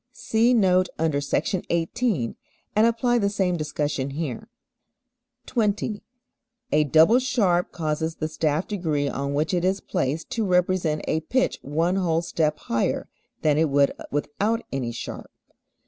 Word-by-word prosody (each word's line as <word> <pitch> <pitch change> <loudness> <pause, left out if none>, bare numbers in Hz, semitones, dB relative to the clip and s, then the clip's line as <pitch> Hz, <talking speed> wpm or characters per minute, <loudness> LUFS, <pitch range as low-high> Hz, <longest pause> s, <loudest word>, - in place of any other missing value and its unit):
(See 240 0 +2
note 185 -4 +3
under 155 -3 +1
Sec. 140 - 0 0.2
18 170 - 0 0.4
and 215 +2 +5
apply 240 +1 +2
the 200 -2 +1
same 190 -3 0
discussion 150 -3 -2
here.) 140 -4 -5 1.0
20. 210 -2 -1 0.7
A 150 - +4
double 160 - +5
sharp 200 -9 +1
causes 160 0 -2
the 155 - -2
staff 155 +1 -1
degree 160 -8 -1
on 140 0 -2
which 155 +5 0
it 175 -1 +1
is 190 +2 +1
placed 160 -4 -2
to 225 - 0
represent 180 -4 +1
a 160 - +1
pitch 255 +12 0
one 165 +6 0
whole 170 -3 +1
step 155 -2 0
higher 115 0 -1 0.3
than 150 -1 +3
it 160 -1 +3
would 140 0 +3 0.2
without 205 +11 -1
any 130 -3 -2
sharp. 115 - -7
165 Hz, 145 wpm, -24 LUFS, 150-200 Hz, 1.0 s, and